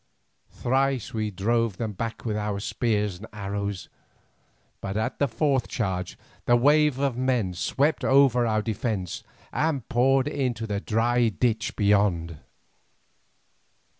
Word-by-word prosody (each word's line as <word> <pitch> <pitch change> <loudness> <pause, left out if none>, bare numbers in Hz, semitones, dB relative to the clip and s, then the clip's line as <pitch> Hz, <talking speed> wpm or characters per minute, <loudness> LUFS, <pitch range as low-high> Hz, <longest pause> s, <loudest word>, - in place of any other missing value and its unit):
Thrice 135 -1 0
we 110 -1 -1
drove 110 +1 0
them 110 -2 -3
back 115 +4 -5
with 110 -2 -1
our 105 -1 -2
spears 105 -3 -1
and 110 - -9
arrows, 100 -1 -4 0.9
but 95 +1 -3
at 110 +4 -2
the 140 - +3
fourth 130 +2 0
charge 95 -7 -3 0.3
the 120 - +6
wave 145 +2 +4
of 135 -3 0
men 125 -8 +1
swept 140 - 0
over 130 -3 +4
our 110 -1 +1
defence, 105 -5 -3 0.3
and 145 -7 0
poured 135 +1 +3
into 125 -6 -2
the 100 -2 -2
dry 115 +3 +2
ditch 110 0 -1
beyond. 100 -6 +1
115 Hz, 130 wpm, -26 LUFS, 100-130 Hz, 0.9 s, the